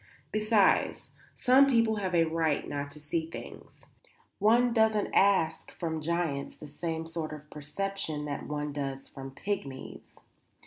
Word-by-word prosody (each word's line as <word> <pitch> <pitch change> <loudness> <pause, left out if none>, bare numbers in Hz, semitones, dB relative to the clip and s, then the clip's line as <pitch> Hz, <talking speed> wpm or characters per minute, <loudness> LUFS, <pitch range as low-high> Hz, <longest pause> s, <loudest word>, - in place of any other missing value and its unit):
Besides, 215 -1 +2 0.2
some 265 +2 +6
people 230 -4 +3
have 185 -3 -1
a 165 - +5
right 160 -2 0
not 145 0 -3
to 150 - -11
see 160 +2 -2
things. - - -10 0.5
One 235 +4 +4
doesn't 220 -2 +2
ask 175 -5 +3
from 160 -2 -2
giants 160 -3 -1
the - - -11
same 160 +2 -4
sort 165 -1 -4
of 150 0 -10
perception 155 0 -3
that 145 -1 -4
one 150 0 -3
does 135 -2 -4
from 135 0 -8
pygmies." 135 -4 -6
165 Hz, 140 wpm, -30 LUFS, 150-200 Hz, 0.5 s, some